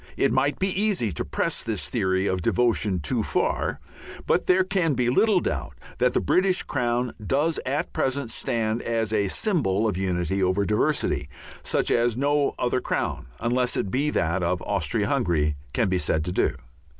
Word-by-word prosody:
It - - +2
might 140 +2 +1
be 190 - 0
easy 195 - +1
to 80 - -2
press - - -1
this - - -2
theory 95 +1 0
of 95 -2 0
devotion 105 -3 +1
too 70 - 0
far, - - -1 0.5
but - - +1
there 185 +1 +4
can 180 -6 0
be 120 -1 +1
little 210 - +4
doubt - - -3 0.2
that 125 0 +3
the - - +4
British 185 0 +2
Crown 120 0 -1
does 145 +9 +1
at 140 +3 -2
present 130 -2 -1
stand 115 0 -1
as 115 -2 -1
a 100 -2 +2
symbol 115 - +1
of 100 -4 -1
unity 95 0 -1
over 95 +2 +2
diversity 105 +1 0 0.3
such - - 0
as 120 -1 +2
no 145 +1 +1
other 125 +1 0
crown, - - -2
unless 125 +2 0
it 95 - -2
be 140 +4 +1
that 85 - 0
of 90 +1 0
Austria - - -1
Hungary, 75 -3 +1 0.2
can 105 +9 +1
be 95 -1 +1
said 80 -2 0
to 90 - -2
do. - - +1
115 Hz, 175 wpm, -25 LUFS, 95-140 Hz, 0.5 s, there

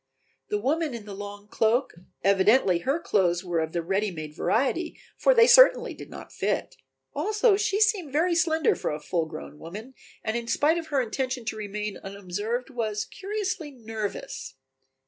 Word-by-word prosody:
The 420 - +1
woman 310 -5 0
in 220 -3 -8
the 205 - -8
long 205 +1 -8
cloak 230 +5 +1 0.3
evidently 195 -1 +4
her 275 - 0
clothes 180 - +1
were 175 -2 -1
of 160 0 -2
the 170 0 -2
ready 195 +4 0
made 155 -4 -7
variety, 275 - 0 0.2
for - - +4
they 465 -1 +8
certainly - - +7
did - - -11
not - - -10
fit. - - -2 0.4
Also 420 - +3
she 410 0 0
seemed 410 -8 +2
very 335 +5 +2
slender 325 -2 +3
for - - -3
a 150 - -3
full 165 +1 -1
grown 155 -1 -9
woman, 210 +10 -9 0.3
and 220 0 -1
in 235 0 -3
spite 310 +7 +2
of 325 - -8
her 280 -4 +1
intention 255 +1 -3
to 225 - -3
remain 210 -1 -4
unobserved 205 +6 -4
was 215 -4 -2
curiously 390 -5 -4
nervous. 225 - -6
230 Hz, 170 wpm, -26 LUFS, 200-320 Hz, 0.4 s, they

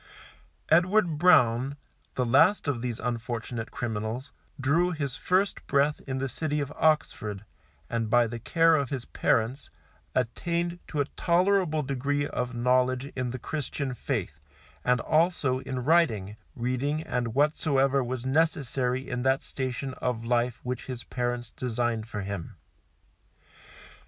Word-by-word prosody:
Edward 175 -1 +3
Brown, 135 -5 +4 0.4
the 125 - +1
last 150 - +4
of 130 -5 0
these 120 -2 -3
unfortunate 115 -1 -3
criminals, 115 +3 -4 0.3
drew 160 +7 +3
his 145 -7 -3
first 190 +2 0
breath 145 +1 +2
in 130 -1 -2
the 135 +1 -1
city 150 +2 -2
of 145 0 -3
Oxford, 105 -10 0 0.4
and 115 -2 -2
by 120 +1 +5
the 115 +1 -5
care 165 +7 +4
of 140 -5 0
his 130 -4 -4
parents, 120 +5 0 0.5
attained 170 +8 -1
to 150 - -1
a - - +1
tolerable 175 -1 +2
degree 140 +2 -1
of 125 -2 -3
knowledge 125 +2 +1
in 130 -1 -2
the 130 - -4
Christian 140 0 -3
faith, 110 - -3 0.4
as 125 0 +3
also 155 -5 +2
in 130 -1 -4
writing, 120 - +2 0.2
reading 130 +5 -1
and 120 -7 -2
whatsoever 140 -2 +2
was 125 0 -4
necessary 130 -3 +1
in 125 -1 -2
that 130 +1 +2
station 130 0 -4
of 120 -2 -2
life 120 0 +1
which 125 0 -4
his 125 -2 -5
parents 120 -1 -3
designed 120 -2 -2
for 105 -2 -4
him. 100 -4 -5
130 Hz, 135 wpm, -28 LUFS, 120-150 Hz, 0.5 s, by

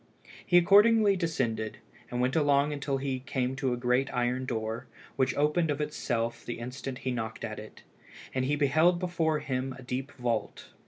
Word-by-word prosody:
He 175 - +4
accordingly 205 +3 +6
descended, 125 -11 -1 0.3
and 125 -1 -3
went 125 +1 +1
along 145 -1 +2
till 140 -1 -1
he 135 -1 -2
came 130 0 -2
to 135 -3 0
a 120 - -1
great 125 +2 +1
iron 125 +1 0
door, 115 +1 -3 0.3
which 130 -2 +1
opened 150 +3 +2
of 145 0 -1
itself 120 -6 -2
the 120 - -5
instant 125 +2 -6
he 130 - +1
knocked 110 -2 -4
at 110 -1 -6
it, 110 0 -12 0.5
and 130 -1 0
he 145 +3 +1
beheld 155 +5 +3
before 165 -3 0
him 130 0 -3
a 130 - -11
deep 130 +3 -4
vault. 120 -4 -3
130 Hz, 175 wpm, -29 LUFS, 125-150 Hz, 0.5 s, accordingly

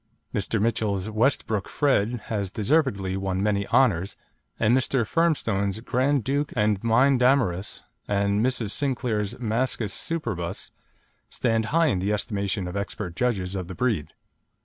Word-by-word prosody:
Mr. - - 0
Mitchell's 110 -2 0
Westbrook 110 -3 0
Fred 120 -5 +1
has 100 -4 -2
deservedly 100 - +1
won 95 0 -1
many 100 -1 0
honours, 110 -7 +2 0.4
and 115 +2 +4
Mr. 130 -2 +1
Firmstone's 110 - +1
Grand 130 +2 +1
Duke 145 +4 -1
and 105 -3 +1
Mynd 125 +4 +4
Damaris, 125 -8 +1 0.2
and 100 +1 +1
Mrs. 120 -5 0
Sinclair's 120 -6 -1
Mascus 115 -3 -1
Superbus, 110 - -3 0.6
stand 115 -2 0
high 165 +8 +2
in 120 - +1
the 100 +3 0
estimation 100 -3 -2
of 90 - -6
expert 100 -3 -4
judges 100 -6 -1
of 90 -2 -4
the 95 - -7
breed. 110 - 0
110 Hz, 135 wpm, -25 LUFS, 100-125 Hz, 0.6 s, and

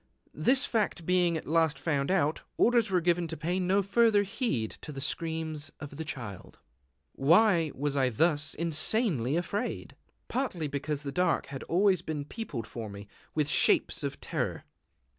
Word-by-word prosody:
This 265 +2 +3
fact 210 -7 -1
being 180 -2 +2
at - - -7
last 160 0 +2
found 140 -4 -1
out, 160 -5 +1 0.2
orders 235 -2 +3
were 185 -2 +2
given 175 0 +1
to 160 0 -6
pay 175 +5 -1
no 190 +2 +2
further 205 +1 +3
heed 190 - -2
to 150 - -8
the 135 - -7
screams 160 0 -3
of 145 -1 -8
the 160 - -4
Child. 120 - -8 0.6
Why 170 +1 +4
was 145 +1 -2
I 130 -2 +2
thus 150 +5 +2
insanely 160 - +3
afraid? 200 +7 -3 0.3
Partly 235 - -2
because 145 +1 -3
the 140 - -4
dark 180 +4 +1
had 135 -1 -7
always 185 0 +2
been 155 -4 -4
peopled 150 - -6
for 115 -1 -7
me 100 0 -10 0.3
with 150 -2 +1
shapes - - +2
of - - -4
terror. - - -3
160 Hz, 160 wpm, -29 LUFS, 145-190 Hz, 0.6 s, Why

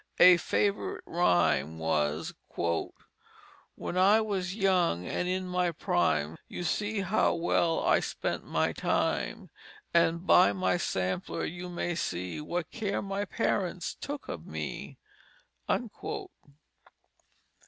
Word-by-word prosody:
A 180 -1 +9
favorite 200 +3 -1
rhyme 80 - +2
was: 80 -1 0 1.4
"When 180 - -4
I 200 +4 +6
was 195 -4 -2
young 180 - +2
and 180 - -2
in 185 +1 -1
my 180 -1 +1
Prime, 80 - 0
You - - -5
see 205 +5 -1
how 195 +3 +2
well 165 0 +1
I - - +4
spent - - -3
my - - 0
Time. - - -1 0.4
And 170 +1 +3
by 180 - +6
my 185 -1 +1
sampler 95 - -2
you 175 +2 -6
may 175 0 -2
see 90 - -3
What 170 +2 -3
care 205 -3 -2
my 200 +1 -2
Parents 185 -6 -1
took 285 0 -6
of 80 - -6
me." 75 -2 -5
175 Hz, 115 wpm, -29 LUFS, -, 1.4 s, A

